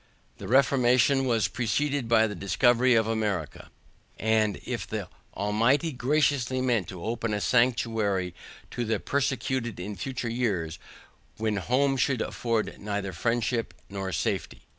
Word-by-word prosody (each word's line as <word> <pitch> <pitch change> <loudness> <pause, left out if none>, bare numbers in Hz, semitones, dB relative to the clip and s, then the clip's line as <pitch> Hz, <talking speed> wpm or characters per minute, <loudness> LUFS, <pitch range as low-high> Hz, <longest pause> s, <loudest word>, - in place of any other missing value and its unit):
The - - -7
reformation 130 0 +4
was 115 -5 +2
preceded 125 +6 -1
by 115 -1 +5
the 105 - -3
discovery 120 +6 +3
of 110 -1 +3
America, 105 -9 -2 0.5
as 110 -1 +2
if - - -4
the - - -4 0.3
Almighty 115 - +2
graciously 130 -1 +1
meant 120 -8 +1
to 90 -3 -8
open 115 -1 -2
a - - -1
sanctuary 110 -6 +1 0.4
to 120 - -2
the 110 -2 0
persecuted 130 -5 -1
in 100 +3 -5
future 125 +5 -4
years, 100 -10 -1 0.6
when 110 -1 -1
home 135 +7 +1
should 130 -1 +1
afford 115 -2 -2
neither 100 -2 -3
friendship 120 0 -1 0.2
nor 95 -1 -4
safety. 75 - -2
115 Hz, 135 wpm, -27 LUFS, 105-125 Hz, 0.6 s, by